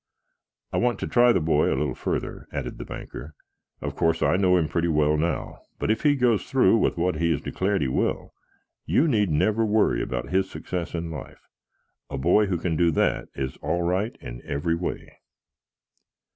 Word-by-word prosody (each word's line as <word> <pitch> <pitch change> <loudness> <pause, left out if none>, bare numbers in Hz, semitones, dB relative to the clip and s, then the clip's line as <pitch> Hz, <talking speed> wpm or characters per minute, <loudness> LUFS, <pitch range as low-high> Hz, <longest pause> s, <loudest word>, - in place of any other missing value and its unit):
"I - - 0
want 120 -1 +1
to - - -2
try 120 0 +5
the - - +3
boy 75 -2 +2
a - - 0
little 75 -4 -1
further," - - -4
added - - -5
the - - -6
banker. 75 +1 -8 0.5
"Of - - -4
course, 80 0 +1
I - - +3
know 90 -1 +4
him 80 -3 +1
pretty 85 +2 0
well 75 -2 +2
now, 80 +3 -2 0.2
but - - 0
if 110 - 0
he 145 -1 +4
goes 120 -5 +2
through 130 -4 +4
with - - +1
what 90 -1 0
he 85 +1 +1
has 80 - +1
declared 100 0 -1
he - - 0
will, 65 - -1 0.5
you 160 - +3
need 105 - +2
never 110 +9 +2
worry 110 0 +2
about 65 +1 -3
his 95 +1 +1
success 90 -2 -5
in 85 0 -4
life. 75 -5 -9 0.6
A 70 - -4
boy 90 +10 +3
who 90 -2 0
can 85 0 -2
do 85 +1 +3
that 80 - 0
is 65 -1 -4
all 85 0 -1
right 95 +6 -1
in - - -8
every 70 +4 -1
way." 85 +1 -5
85 Hz, 195 wpm, -25 LUFS, 75-105 Hz, 0.6 s, try